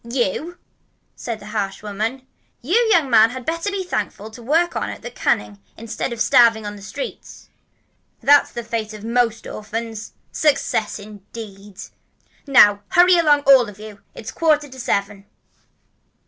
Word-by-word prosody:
"You!" 250 Hz, -, -2 dB, 0.6 s
said 230 Hz, -3 st, -6 dB
the 205 Hz, -, -13 dB
harsh 200 Hz, -2 st, -3 dB
woman. 220 Hz, +6 st, -4 dB, 0.4 s
"You, 305 Hz, +9 st, -3 dB, 0.2 s
young 330 Hz, -8 st, +4 dB
man, 225 Hz, -3 st, +5 dB
had 255 Hz, +1 st, -8 dB
better 335 Hz, +4 st, -2 dB
be 395 Hz, -1 st, -3 dB
thankful 215 Hz, -, -4 dB
to 235 Hz, +2 st, -12 dB
work 325 Hz, +8 st, +1 dB
on -, -, -2 dB
at -, -, -9 dB
the 240 Hz, -, -7 dB
canning 105 Hz, -, -1 dB, 0.2 s
instead 230 Hz, +2 st, -5 dB
of 235 Hz, -, -6 dB
starving 230 Hz, -3 st, +4 dB
in 205 Hz, 0 st, -5 dB
the 205 Hz, -, -12 dB
streets. 470 Hz, -, -8 dB, 0.7 s
That's 290 Hz, 0 st, +4 dB
the 235 Hz, -, -6 dB
fate 225 Hz, -2 st, -4 dB
of 210 Hz, -, -11 dB
most 230 Hz, -1 st, 0 dB
orphans. 220 Hz, 0 st, -6 dB, 0.2 s
Success 275 Hz, -7 st, 0 dB
indeed! 205 Hz, -1 st, -11 dB, 0.7 s
Now 205 Hz, -7 st, +6 dB
hurry 355 Hz, 0 st, +5 dB
along, 295 Hz, -3 st, +4 dB
all 270 Hz, -5 st, +5 dB
of 200 Hz, -, -13 dB
you. 215 Hz, -1 st, -11 dB
It's 220 Hz, -, -8 dB
quarter 305 Hz, -2 st, +1 dB
to 260 Hz, 0 st, -12 dB
seven." 200 Hz, -5 st, -2 dB
230 Hz, 155 wpm, -20 LUFS, 210-275 Hz, 0.7 s, Now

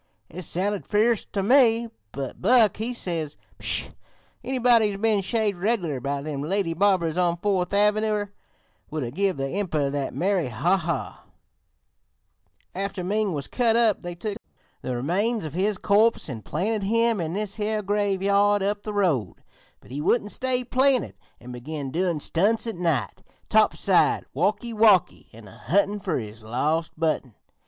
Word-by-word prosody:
It 180 Hz, -, -7 dB
sounded 190 Hz, +4 st, -2 dB
fierce 220 Hz, +1 st, +2 dB
ter 195 Hz, -, -3 dB
me, 235 Hz, 0 st, +4 dB, 0.2 s
but 135 Hz, -1 st, -6 dB
Buck 220 Hz, -1 st, +4 dB
he 225 Hz, +3 st, -3 dB
says: 165 Hz, -10 st, -3 dB, 0.2 s
"'Pshaw! -, -, 0 dB, 0.5 s
Anybody 245 Hz, -4 st, +3 dB
who's 200 Hz, -1 st, -5 dB
been 215 Hz, -2 st, +2 dB
shaved 205 Hz, -1 st, 0 dB
reg'lar 180 Hz, -, -1 dB
by 140 Hz, +2 st, -3 dB
them 145 Hz, -2 st, -4 dB
lady 175 Hz, +2 st, -1 dB
barbers 180 Hz, -2 st, +1 dB
on 175 Hz, -1 st, +1 dB
Fourth 185 Hz, -1 st, 0 dB
Avenyer 210 Hz, 0 st, +1 dB, 0.6 s
would 155 Hz, -1 st, -3 dB
'a' 120 Hz, -, -4 dB
give 190 Hz, +3 st, 0 dB
the 135 Hz, -, -3 dB
Emprer 155 Hz, -2 st, -1 dB
the 140 Hz, -1 st, -2 dB
merry 185 Hz, -4 st, 0 dB
ha 140 Hz, -, +1 dB
ha 170 Hz, -6 st, -4 dB, 0.7 s
' -, -, -45 dB
"After 200 Hz, -2 st, -4 dB
Ming 205 Hz, +1 st, 0 dB
was 140 Hz, -2 st, -3 dB
cut 235 Hz, -3 st, +1 dB
up 230 Hz, -3 st, +3 dB
they 175 Hz, -1 st, -6 dB
took 205 Hz, +3 st, -4 dB, 0.4 s
the 125 Hz, -, -3 dB
remains 195 Hz, -, -1 dB
of 150 Hz, -, -6 dB
his 195 Hz, +3 st, 0 dB
corpse 215 Hz, +4 st, +2 dB
an' 120 Hz, -7 st, -6 dB
planted 205 Hz, -, -2 dB
him 230 Hz, +1 st, +1 dB
in 165 Hz, 0 st, -3 dB
this 205 Hz, +1 st, -3 dB
here 215 Hz, 0 st, -1 dB
graveyard 200 Hz, 0 st, +2 dB
up 205 Hz, +1 st, -1 dB
the 210 Hz, -, -6 dB
road; 175 Hz, -, 0 dB, 0.4 s
but -, -, -17 dB
he 140 Hz, +3 st, -4 dB
wouldn't 205 Hz, +5 st, +1 dB
stay 255 Hz, -1 st, 0 dB
planted 260 Hz, -1 st, +2 dB, 0.3 s
an' 125 Hz, +1 st, -11 dB
began 135 Hz, +3 st, -6 dB
doin' 175 Hz, 0 st, 0 dB
stunts 205 Hz, +11 st, +1 dB
at 225 Hz, -, -3 dB
night, 160 Hz, -, -1 dB, 0.3 s
'topside -, -, +3 dB
walkee 210 Hz, -, -1 dB
walkee' 210 Hz, -5 st, +3 dB
an' 110 Hz, -1 st, -14 dB
a 95 Hz, -, -15 dB
huntin' 200 Hz, -, +1 dB
fer 185 Hz, -5 st, -2 dB
his 110 Hz, -1 st, -7 dB
lost 150 Hz, +9 st, -1 dB
button. 155 Hz, -8 st, -1 dB
195 Hz, 165 wpm, -24 LUFS, 155-215 Hz, 0.7 s, me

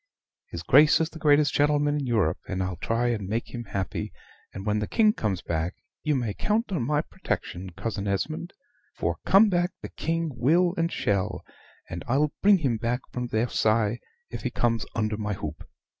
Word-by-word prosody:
His -, -, -6 dB
Grace 150 Hz, +1 st, +6 dB
is 160 Hz, 0 st, 0 dB
the 160 Hz, -, -10 dB
greatest 145 Hz, -1 st, +4 dB
gentleman 145 Hz, 0 st, +3 dB
in 140 Hz, -, -3 dB
Europe, 105 Hz, -10 st, +1 dB
and 95 Hz, 0 st, -2 dB
I'll 95 Hz, -1 st, -3 dB
try 115 Hz, +6 st, 0 dB
and 105 Hz, -5 st, -2 dB
make 115 Hz, +4 st, -3 dB
him 120 Hz, -1 st, -5 dB
happy; 100 Hz, -2 st, -3 dB, 0.4 s
and, 95 Hz, -, -7 dB
when 105 Hz, 0 st, +1 dB
the 105 Hz, -, -2 dB
King 215 Hz, -2 st, +4 dB
comes 95 Hz, -, -2 dB
back, 85 Hz, +2 st, -2 dB, 0.3 s
you 150 Hz, -2 st, +1 dB
may 120 Hz, -6 st, -1 dB
count 215 Hz, -, 0 dB
on 175 Hz, -, 0 dB
my 150 Hz, 0 st, +2 dB
protection, 95 Hz, -, -4 dB
Cousin 105 Hz, 0 st, -4 dB
Esmond 155 Hz, -, -2 dB, 0.4 s
for -, -, -1 dB
come 200 Hz, +3 st, +7 dB
back 175 Hz, -2 st, +1 dB
the -, -, -5 dB
King 165 Hz, 0 st, -2 dB
will 170 Hz, +9 st, +3 dB
and 165 Hz, 0 st, 0 dB
shall; 100 Hz, -8 st, -1 dB, 0.4 s
and 85 Hz, 0 st, -6 dB
I'll 145 Hz, +4 st, +2 dB
bring 200 Hz, 0 st, +6 dB
him 135 Hz, -9 st, 0 dB
back 120 Hz, +3 st, -1 dB
from 125 Hz, 0 st, -3 dB
Versailles, 110 Hz, 0 st, +1 dB, 0.3 s
if -, -, -5 dB
he -, -, -1 dB
comes 115 Hz, -2 st, 0 dB
under 110 Hz, -1 st, 0 dB
my 105 Hz, -1 st, -2 dB
hoop." 80 Hz, -4 st, -7 dB
120 Hz, 190 wpm, -26 LUFS, 105-155 Hz, 0.4 s, come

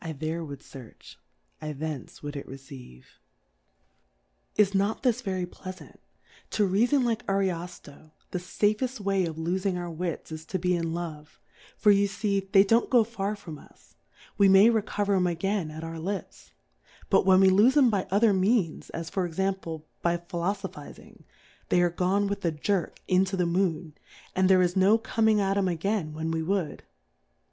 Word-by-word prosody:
there 160 Hz, +3 st, -3 dB
ivould 145 Hz, -3 st, -9 dB
fearch, 130 Hz, -5 st, -13 dB, 0.4 s
I 155 Hz, 0 st, -4 dB
thence 150 Hz, -1 st, -6 dB
ivould 145 Hz, 0 st, -6 dB
it 140 Hz, -, -6 dB
receive. 130 Hz, -, -13 dB, 1.4 s
Is 205 Hz, -2 st, +3 dB
not 200 Hz, +5 st, 0 dB
this 250 Hz, -1 st, +2 dB
very 190 Hz, -5 st, -2 dB
pleafant? 185 Hz, +1 st, -11 dB, 0.5 s
Toreafon 220 Hz, +7 st, +2 dB
like 230 Hz, -3 st, -1 dB
Anofioy 175 Hz, -6 st, -3 dB, 0.2 s
the 180 Hz, -, -2 dB
fafeft 215 Hz, +7 st, -1 dB
Way 195 Hz, -3 st, 0 dB
of 160 Hz, -, -5 dB
lofing 180 Hz, +3 st, -1 dB
our 175 Hz, -1 st, -5 dB
Wits 165 Hz, 0 st, -4 dB
is 160 Hz, 0 st, -6 dB
to 185 Hz, -, -3 dB
be 180 Hz, 0 st, +1 dB
in 165 Hz, -1 st, -2 dB
Love; 155 Hz, -3 st, -7 dB, 0.4 s
for 210 Hz, -, +5 dB
you 200 Hz, 0 st, +4 dB
fee 195 Hz, -1 st, -2 dB
they 195 Hz, -, +7 dB
don't 225 Hz, +4 st, +2 dB
go 245 Hz, -3 st, +5 dB
far 210 Hz, -2 st, -3 dB
from 160 Hz, -7 st, -10 dB
us, -, -, -21 dB, 0.5 s
v^e 200 Hz, -1 st, +6 dB
may 195 Hz, +4 st, +7 dB
recover 205 Hz, -2 st, 0 dB
'em 185 Hz, -2 st, +2 dB
again 180 Hz, 0 st, -1 dB
at 155 Hz, +1 st, -8 dB
our 165 Hz, 0 st, -6 dB
Lips; 190 Hz, +2 st, -6 dB, 0.6 s
but -, -, +5 dB
when 190 Hz, 0 st, +5 dB
we 190 Hz, 0 st, +6 dB
lofe 220 Hz, +9 st, +5 dB
'em 260 Hz, -5 st, +5 dB
by 195 Hz, -3 st, 0 dB
otlier 205 Hz, +1 st, +3 dB
Means, 190 Hz, -3 st, +1 dB
as 165 Hz, 0 st, -6 dB
for 190 Hz, -, -1 dB
Example, 170 Hz, -3 st, -3 dB, 0.2 s
by 170 Hz, 0 st, +1 dB
Philofophizing, 175 Hz, -1 st, -6 dB, 0.5 s
they -, -, +3 dB
are 175 Hz, -1 st, +3 dB
gone 185 Hz, +4 st, +1 dB
with 200 Hz, 0 st, -3 dB
a 170 Hz, -, +2 dB
Jerk 175 Hz, +4 st, -2 dB
into 190 Hz, +1 st, +2 dB
the 180 Hz, -, +1 dB
Moon, 170 Hz, -2 st, -1 dB, 0.4 s
and 185 Hz, 0 st, +3 dB
there 185 Hz, -1 st, +6 dB
is 175 Hz, +1 st, 0 dB
no 195 Hz, +3 st, +5 dB
coming 220 Hz, -1 st, +1 dB
at 195 Hz, 0 st, +1 dB
'em 195 Hz, -1 st, +2 dB
again 180 Hz, -1 st, -1 dB
when 160 Hz, +1 st, -3 dB
we 165 Hz, 0 st, -1 dB
would. 180 Hz, -2 st, -2 dB
185 Hz, 170 wpm, -27 LUFS, 165-200 Hz, 1.4 s, they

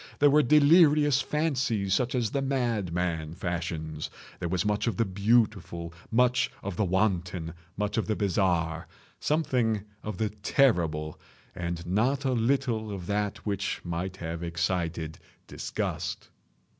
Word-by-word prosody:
There 145 Hz, 0 st, +5 dB
were 150 Hz, +1 st, +6 dB
delirious 150 Hz, 0 st, +5 dB
fancies 130 Hz, -10 st, 0 dB
such 125 Hz, +5 st, +1 dB
as 115 Hz, -3 st, 0 dB
the 140 Hz, -, 0 dB
madman 90 Hz, -, -1 dB
fashions. 80 Hz, -3 st, -3 dB, 0.3 s
There 85 Hz, -, -2 dB
was 95 Hz, +3 st, 0 dB
much 105 Hz, +2 st, 0 dB
of 110 Hz, -6 st, 0 dB
the 115 Hz, -, +2 dB
beautiful, 100 Hz, -4 st, +1 dB, 0.2 s
much 125 Hz, +2 st, +3 dB
of 100 Hz, -2 st, -4 dB
the 105 Hz, -, +1 dB
wanton, 90 Hz, -3 st, 0 dB, 0.2 s
much 105 Hz, +2 st, -1 dB
of -, -, -2 dB
the 110 Hz, -, +1 dB
bizarre, 85 Hz, -5 st, 0 dB, 0.3 s
something 125 Hz, -9 st, +1 dB, 0.2 s
of 105 Hz, -3 st, -5 dB
the 110 Hz, -1 st, 0 dB
terrible, 85 Hz, -, +1 dB, 0.3 s
and 85 Hz, -1 st, -4 dB
not 125 Hz, +10 st, +1 dB
a 130 Hz, -, +2 dB
little 115 Hz, -3 st, 0 dB
of 95 Hz, -3 st, -5 dB
that 105 Hz, +1 st, -2 dB
which 100 Hz, -2 st, -1 dB
might 90 Hz, +2 st, -3 dB
have 85 Hz, -1 st, -5 dB
excited 85 Hz, -2 st, -2 dB, 0.3 s
disgust. -, -, -4 dB
100 Hz, 135 wpm, -28 LUFS, 85-125 Hz, 0.3 s, were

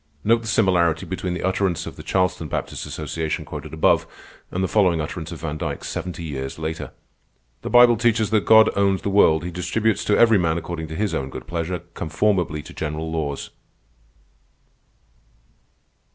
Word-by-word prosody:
Note 115 Hz, +2 st, +3 dB
the 115 Hz, -, -8 dB
similarity 90 Hz, -6 st, +2 dB
between 90 Hz, 0 st, -3 dB
the -, -, -5 dB
utterance 95 Hz, -2 st, 0 dB
of -, -, -8 dB
the -, -, -9 dB
Charleston 90 Hz, -3 st, 0 dB
Baptist -, -, -4 dB
Association 80 Hz, +1 st, -3 dB
quoted -, -, -7 dB
above, 80 Hz, -, +2 dB, 0.4 s
and 95 Hz, -, -2 dB
the -, -, +1 dB
following 90 Hz, -6 st, +3 dB
utterance 80 Hz, +1 st, -5 dB
of 85 Hz, -, -8 dB
Van 75 Hz, -1 st, -4 dB
Dyke -, -, -4 dB
seventy 90 Hz, -2 st, -5 dB
years 65 Hz, -4 st, -5 dB
later: 80 Hz, 0 st, -4 dB, 0.7 s
"_The -, -, -5 dB
Bible 120 Hz, -1 st, +7 dB
teaches 115 Hz, -2 st, +1 dB
that 110 Hz, -2 st, +3 dB
God 110 Hz, 0 st, +6 dB
owns 100 Hz, -1 st, +1 dB
the 100 Hz, -, -1 dB
world. 80 Hz, -6 st, +4 dB
He 90 Hz, -, -4 dB
distributes 95 Hz, +6 st, 0 dB
to 105 Hz, -, +3 dB
every 115 Hz, -3 st, +5 dB
man 80 Hz, -2 st, +1 dB
according 85 Hz, -1 st, -5 dB
to 80 Hz, -, -7 dB
His 105 Hz, +3 st, -1 dB
own 65 Hz, 0 st, -2 dB
good 65 Hz, -1 st, -8 dB
pleasure, 85 Hz, +3 st, -3 dB
conformably 80 Hz, -1 st, 0 dB
to -, -, -12 dB
general 80 Hz, +1 st, -4 dB
laws. 75 Hz, -4 st, -3 dB
85 Hz, 170 wpm, -22 LUFS, 80-100 Hz, 0.7 s, Bible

